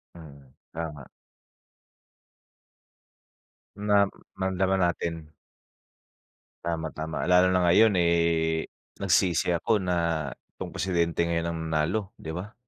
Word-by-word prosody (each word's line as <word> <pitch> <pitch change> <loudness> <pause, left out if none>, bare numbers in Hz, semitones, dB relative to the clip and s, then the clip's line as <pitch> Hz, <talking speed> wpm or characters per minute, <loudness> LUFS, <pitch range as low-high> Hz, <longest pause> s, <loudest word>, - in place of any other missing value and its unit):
Mm, 70 -5 -14 0.2
tama. 75 -4 -6 2.7
Na 105 -1 +4 0.3
maramdaman 95 0 0
natin. 85 -2 -2 1.3
Tama, 80 -2 -2
tama. 80 0 -4
Lalo 90 +1 +5
na 90 -1 +2
ngayon, 100 +3 +5
eh, 85 -2 +2 0.3
nagsisi 90 -1 +2
ako 90 +5 +1
na 85 -5 0 0.3
'tong - - -3
presidente 85 -2 0
ngayon 85 0 -1
ang 85 - -3 0.2
nanalo, 95 +7 0
'di 80 - -7
ba. 105 +5 -7
85 Hz, 100 wpm, -27 LUFS, 80-95 Hz, 2.7 s, Lalo